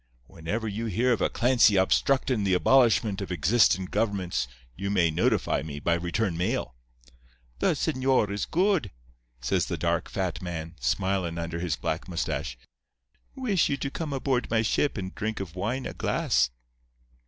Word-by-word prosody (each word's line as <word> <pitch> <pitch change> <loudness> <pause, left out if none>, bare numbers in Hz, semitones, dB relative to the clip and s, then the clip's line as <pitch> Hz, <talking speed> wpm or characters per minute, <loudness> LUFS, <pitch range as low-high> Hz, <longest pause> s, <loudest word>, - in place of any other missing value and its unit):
Whenever 85 - -4
you 110 +3 -3
hear 120 +5 +2
of 115 - -2
a - - +2
Clancy 120 -4 +4
obstructin' 120 +4 +2
the 95 -2 +2
abolishment 110 -2 +3
of 100 - -5
existin' 95 +3 +3
governments 95 - -1 0.3
you 100 +6 -3
may 85 -5 +3
notify 80 - +1
me 75 -2 -6
by 85 - +1
return 85 +3 -1
mail.' 90 - -1 0.9
"'The - - +3
señor 130 -5 +1
is 100 - -2
good,' 185 - +1 0.5
says - - 0
the - - -3
dark, - - -1
fat - - -3
man, 85 -2 -5
smilin' 95 -3 0
under 85 0 -4
his 85 -4 -1
black - - -3
mustache. - - -3 0.8
'Wish 220 -10 +1
you 140 - 0
to 140 - -4
come 160 -1 -4
aboard 130 -2 -1
my 110 -1 +2
ship 140 +5 +1
and 95 -1 -5
drink 110 +1 -3
of 90 -3 -6
wine 120 +8 -2
a - - -4
glass. - - +1
100 Hz, 160 wpm, -27 LUFS, 85-125 Hz, 0.9 s, Clancy